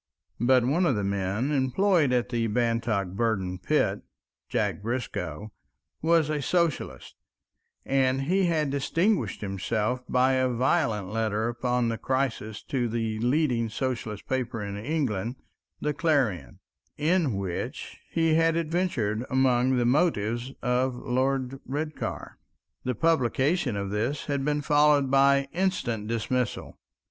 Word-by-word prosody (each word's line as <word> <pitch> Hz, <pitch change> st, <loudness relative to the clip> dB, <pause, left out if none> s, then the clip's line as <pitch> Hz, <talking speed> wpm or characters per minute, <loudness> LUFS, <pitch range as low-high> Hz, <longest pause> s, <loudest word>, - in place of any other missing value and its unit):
But 125 Hz, +1 st, +4 dB
one 170 Hz, +8 st, +2 dB
of 135 Hz, -, +2 dB
the 105 Hz, -, -1 dB
men 100 Hz, +6 st, -1 dB
employed 150 Hz, +3 st, +2 dB
at 125 Hz, -1 st, +1 dB
the 115 Hz, -2 st, 0 dB
Bantock 115 Hz, -3 st, 0 dB
Burden 95 Hz, -3 st, -1 dB
pit, -, -, +1 dB, 0.5 s
Jack -, -, -1 dB
Briscoe, 105 Hz, -5 st, -4 dB, 0.5 s
was 165 Hz, -1 st, +3 dB
a 150 Hz, -1 st, -1 dB
socialist, 170 Hz, +2 st, -1 dB, 0.7 s
and 135 Hz, 0 st, +2 dB
he 185 Hz, +6 st, +2 dB
had 155 Hz, -5 st, +1 dB
distinguished 140 Hz, -, 0 dB
himself 105 Hz, +5 st, -1 dB
by 130 Hz, +1 st, +3 dB
a 130 Hz, 0 st, +2 dB
violent 125 Hz, -, +1 dB
letter 110 Hz, 0 st, 0 dB
upon 125 Hz, 0 st, 0 dB
the 115 Hz, -, -3 dB
crisis 130 Hz, -5 st, -2 dB
to 125 Hz, -3 st, -1 dB
the 110 Hz, -1 st, -2 dB
leading 125 Hz, -2 st, +1 dB
socialistic 115 Hz, -4 st, -4 dB
paper 125 Hz, -4 st, -2 dB
in 100 Hz, 0 st, -5 dB
England, 115 Hz, -2 st, -2 dB, 0.5 s
The 150 Hz, -, 0 dB
Clarion, 130 Hz, -, 0 dB, 0.4 s
in 155 Hz, -, +1 dB
which 95 Hz, -3 st, -5 dB
he 165 Hz, -1 st, +2 dB
had 165 Hz, 0 st, +3 dB
adventured 155 Hz, -, -1 dB
among 130 Hz, -1 st, +3 dB
the 120 Hz, -, +2 dB
motives 120 Hz, -4 st, +1 dB
of 125 Hz, +1 st, +1 dB
Lord 130 Hz, +1 st, -1 dB
Redcar. 150 Hz, +3 st, -5 dB, 0.4 s
The 125 Hz, -1 st, -1 dB
publication 140 Hz, -, +1 dB
of 100 Hz, -1 st, -3 dB
this 120 Hz, +8 st, -1 dB
had 140 Hz, -2 st, -1 dB
been 150 Hz, +1 st, 0 dB
followed 145 Hz, -2 st, +4 dB
by 140 Hz, 0 st, +4 dB
instant 155 Hz, -, -1 dB
dismissal. 115 Hz, +2 st, -2 dB
125 Hz, 130 wpm, -27 LUFS, 110-145 Hz, 0.7 s, But